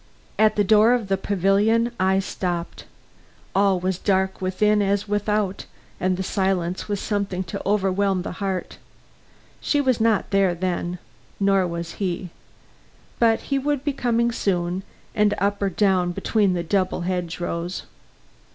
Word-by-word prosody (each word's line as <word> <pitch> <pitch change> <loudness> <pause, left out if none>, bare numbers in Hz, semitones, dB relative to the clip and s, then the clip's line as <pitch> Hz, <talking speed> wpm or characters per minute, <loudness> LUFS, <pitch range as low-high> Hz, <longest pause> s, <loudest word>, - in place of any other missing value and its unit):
At 215 0 +4
the 205 - +3
door 215 +3 +5
of 225 -5 -4
the 195 - +3
pavilion 205 +5 +2
I 190 +1 +3
stopped. 180 -3 -3 0.7
All 195 -1 +3
was 185 0 -2
dark 190 -1 0
within 210 +3 +2
as 200 +1 0
without, 205 -1 -1 0.3
and 185 0 0
the 190 - -2
silence 190 -2 -1
was 205 -2 -2
something 200 -4 -2
to 190 +3 -6
overwhelm 195 -2 +1
the - - -5
heart. 190 -2 -3 0.8
She 290 - +1
was 260 -5 +1
not 220 -3 +2
there 195 -3 +3
then, 175 0 -2 0.4
nor 195 -2 +3
was 170 -1 -5
he. 180 -2 -2 0.9
But 225 -1 +3
he 275 - +2
would 285 0 -1
be 290 -1 0
coming 235 -2 +1
soon, 180 -4 -1 0.3
and 210 -1 +2
up 200 +1 0
or 200 - +2
down 185 -2 +1
between 205 0 +1
the 175 -1 -1
double 185 +1 0
hedge 175 -1 -3
rows. 175 +1 -3
195 Hz, 150 wpm, -23 LUFS, 185-210 Hz, 0.9 s, door